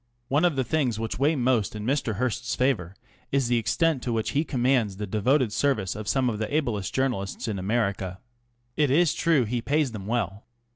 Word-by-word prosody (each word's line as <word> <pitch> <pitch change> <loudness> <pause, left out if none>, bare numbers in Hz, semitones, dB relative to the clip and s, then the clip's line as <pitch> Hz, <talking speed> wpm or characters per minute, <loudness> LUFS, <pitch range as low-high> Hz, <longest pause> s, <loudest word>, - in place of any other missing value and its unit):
One 145 +5 +3
of 170 -4 +2
the 130 - +1
things 125 -6 0
which 115 +1 -3
weigh 150 +4 +3
most 120 -6 +1
in 105 0 -5
Mr. 130 -4 0
Hearst's 125 +2 -1
favour 110 -9 0 0.4
is 135 -3 +1
the 120 -1 +3
extent 160 +4 +1
to 120 - -3
which 115 -1 -1
he 145 - +1
commands 125 -8 +1
the 105 - -3
devoted 110 +4 +1
service 110 -11 0
of 105 -1 -6
some 130 +1 +2
of 110 -3 -1
the 110 - -3
ablest 120 -11 -1
journalists 125 -5 -1
in 105 -3 -2
America. 100 -2 -1 0.6
It 150 -2 +2
is 160 +3 +4
true 155 -7 +2
he 120 +2 -2
pays 145 +1 +1
them 100 -3 -7
well. 105 -3 -2
120 Hz, 200 wpm, -26 LUFS, 105-135 Hz, 0.6 s, is